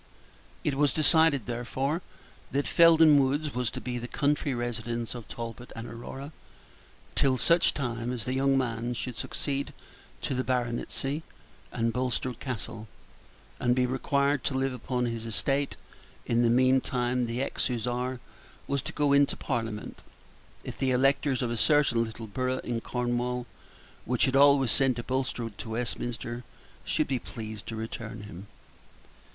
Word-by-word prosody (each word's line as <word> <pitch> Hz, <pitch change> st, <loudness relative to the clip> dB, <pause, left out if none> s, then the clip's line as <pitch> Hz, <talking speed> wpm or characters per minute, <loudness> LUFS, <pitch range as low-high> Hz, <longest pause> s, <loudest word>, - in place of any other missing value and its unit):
It 145 Hz, -, +1 dB
was 145 Hz, +1 st, +3 dB
decided, 155 Hz, -5 st, +4 dB
therefore, 130 Hz, +6 st, -2 dB, 0.5 s
that 140 Hz, +1 st, 0 dB
Felden 160 Hz, -4 st, +7 dB
Woods 145 Hz, +3 st, 0 dB
was 125 Hz, -2 st, 0 dB
to -, -, -6 dB
be 125 Hz, -1 st, -3 dB
the 120 Hz, -, -5 dB
country 145 Hz, +2 st, +1 dB
residence 120 Hz, -1 st, -3 dB
of 120 Hz, -3 st, -8 dB
Talbot 115 Hz, +1 st, -7 dB
and 115 Hz, +1 st, -6 dB
Aurora 135 Hz, +5 st, -7 dB, 0.8 s
till 130 Hz, -2 st, +3 dB
such 170 Hz, +5 st, +4 dB
time 120 Hz, -3 st, -2 dB
as 125 Hz, -3 st, -3 dB
the 130 Hz, -, -2 dB
young 135 Hz, +1 st, +3 dB
man 120 Hz, -1 st, -1 dB
should 125 Hz, +1 st, -4 dB
succeed 140 Hz, +4 st, -3 dB, 0.5 s
to -, -, 0 dB
the 130 Hz, 0 st, 0 dB
baronetcy 130 Hz, +4 st, -1 dB, 0.5 s
and 115 Hz, 0 st, 0 dB
Bulstrode 125 Hz, -1 st, -1 dB
Castle, 115 Hz, -3 st, -5 dB, 0.7 s
and 120 Hz, 0 st, +2 dB
be 130 Hz, 0 st, +3 dB
required 140 Hz, +2 st, +1 dB
to 135 Hz, -, 0 dB
live 135 Hz, 0 st, +1 dB
upon 125 Hz, 0 st, -2 dB
his 115 Hz, -1 st, -3 dB
estate. 135 Hz, +5 st, 0 dB, 0.5 s
In 120 Hz, 0 st, +2 dB
the 120 Hz, -, +4 dB
meantime 125 Hz, 0 st, +2 dB
the 115 Hz, +2 st, -3 dB
ex -, -, -1 dB
Hussar 125 Hz, +1 st, -2 dB, 0.5 s
was 140 Hz, -1 st, -1 dB
to -, -, -6 dB
go 145 Hz, -1 st, +2 dB
into 140 Hz, 0 st, +4 dB
Parliament, 115 Hz, -4 st, -3 dB, 0.6 s
if -, -, -7 dB
the 135 Hz, -, +2 dB
electors 135 Hz, +1 st, +2 dB
of 120 Hz, -, -1 dB
a 120 Hz, -, -1 dB
certain 140 Hz, -3 st, +4 dB
little 110 Hz, 0 st, -6 dB
borough 130 Hz, +4 st, -1 dB
in 120 Hz, -1 st, -2 dB
Cornwall, 125 Hz, 0 st, -1 dB, 0.6 s
which 125 Hz, 0 st, +2 dB
had 130 Hz, -, 0 dB
always 140 Hz, -3 st, +6 dB
sent 135 Hz, -3 st, +3 dB
a 120 Hz, -, -3 dB
Bulstrode 125 Hz, -4 st, -2 dB
to 115 Hz, -, -6 dB
Westminster, 120 Hz, +1 st, -3 dB, 0.4 s
should -, -, +1 dB
be 130 Hz, -2 st, 0 dB
pleased 110 Hz, -2 st, -8 dB
to 115 Hz, -, -4 dB
return 110 Hz, -1 st, -6 dB
him. 100 Hz, -1 st, -9 dB
125 Hz, 155 wpm, -29 LUFS, 115-135 Hz, 0.8 s, Felden